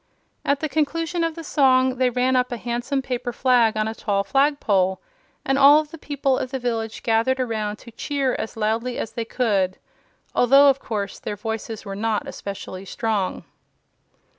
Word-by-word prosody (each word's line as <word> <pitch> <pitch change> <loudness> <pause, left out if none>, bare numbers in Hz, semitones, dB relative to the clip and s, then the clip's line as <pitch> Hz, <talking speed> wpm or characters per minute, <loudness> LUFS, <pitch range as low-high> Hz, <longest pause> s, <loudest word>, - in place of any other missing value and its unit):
At 280 0 +1
the 310 - 0
conclusion 330 +3 -1
of 330 -1 -1
the 330 - -7
song 260 -3 +3
they 255 0 +3
ran 250 +1 +1
up 250 0 +1
a 240 - -2
handsome 245 +4 -2
paper 245 -1 -3
flag 240 -3 +3
on 215 0 +1
a 220 - -3
tall 200 -3 -1
flagpole, 215 -9 +2 0.5
and 270 +1 +1
all 285 +2 +8
of 305 -1 -12
the 330 - -10
people 275 -3 0
of 255 - -3
the 265 - -3
village 225 -3 -3
gathered 230 +3 +2
around 215 -4 -2
to 235 +2 -14
cheer 275 +2 -1
as 225 - -5
loudly 225 +3 -1
as - - -4
they 230 - -4
could 200 -7 0 0.6
although, 275 +3 +6
of 270 - -5
course, 205 -5 -4
their 210 - -4
voices 220 +1 -5
were 195 -1 -5
not 215 +1 -1
especially 195 -1 -7
strong. 210 -2 -2
245 Hz, 180 wpm, -23 LUFS, 220-270 Hz, 0.6 s, all